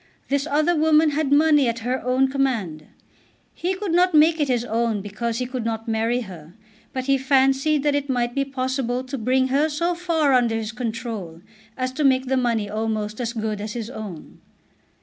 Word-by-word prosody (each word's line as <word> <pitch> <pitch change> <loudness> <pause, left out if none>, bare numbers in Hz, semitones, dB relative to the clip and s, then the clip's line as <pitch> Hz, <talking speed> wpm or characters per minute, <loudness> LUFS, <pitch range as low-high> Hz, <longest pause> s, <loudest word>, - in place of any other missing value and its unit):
This 280 +2 0
other 310 +3 +2
woman 310 0 +4
had 290 -1 -1
money 295 -2 +5
at 235 0 -2
her 255 +1 -1
own 255 +2 +2
command. 235 - -2 0.7
He 370 +2 -2
could 390 -2 -4
not 355 0 +3
make 315 +2 +5
it 295 - +1
his 245 -2 0
own 230 -2 0
because 220 +4 -4
he 250 - -2
could 250 -1 -4
not 225 0 -3
marry 225 +2 0
her, 175 -6 -11 0.4
but 260 - -3
he 275 0 +2
fancied 270 +2 +2
that 295 -1 +2
it 285 0 -1
might 240 -2 0
be 275 - 0
possible 260 -2 -2
to 260 +2 -6
bring 260 +3 +1
her 290 +4 +2
so 335 +4 0
far 330 -5 +1
under 240 -3 +3
his 220 0 -3
control 225 -8 -5 0.4
as 255 0 -2
to 295 +4 -2
make 260 -1 +3
the 265 +1 0
money 235 -5 0
almost 215 +1 -3
as 235 -1 -2
good 215 -3 -3
as 210 0 -5
his 235 -1 -5
own. 205 -10 -9
255 Hz, 195 wpm, -23 LUFS, 225-285 Hz, 0.7 s, money